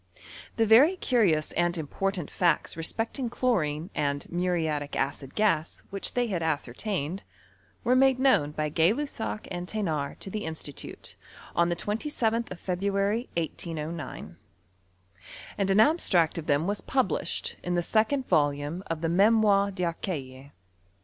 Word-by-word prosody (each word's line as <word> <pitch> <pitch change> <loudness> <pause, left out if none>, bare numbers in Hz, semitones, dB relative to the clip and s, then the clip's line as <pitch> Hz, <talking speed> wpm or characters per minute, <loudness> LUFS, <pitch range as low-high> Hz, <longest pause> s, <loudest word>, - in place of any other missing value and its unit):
Tlie 225 - +4
very 260 - +6
curious 200 - +2
and 175 0 0
important 175 +2 -3
facts 175 -4 +1
respecting 225 - -2
chlorine 180 - 0
and 145 -2 -1
muriatic 165 -5 -1
acid 135 0 -2
gas 170 -7 +1
which 195 0 -3
they 245 0 +2
had 190 -7 -2
ascer 145 -6 -1
tdned, 190 - -3 0.6
were 250 +1 +3
made 265 0 +5
known 260 - +4
by 150 0 -2
Gay 165 +6 +3
Lussac 235 -6 -4
and 175 -1 -4
The 215 +1 -3
nard 150 -5 -2
to 195 - -7
the 215 +1 -3
Institute, 160 -3 -7 0.4
on 170 0 +3
the27th 225 - -1
of 180 - -8
February, 200 +5 -1
1809, 160 -1 -4 1.2
and 195 -1 0
an 195 +2 +4
abstract 195 - +3
of 160 - -8
them 145 +3 +2
was 205 +2 -1
published 200 - -1
in 175 0 -2
thesecond 220 +9 +1
volume 145 +1 +1
of 165 -1 -3
the 165 - 0
Memoires 200 +1 +4
d'Arcueil. 150 -7 -4
180 Hz, 135 wpm, -28 LUFS, 155-215 Hz, 1.2 s, very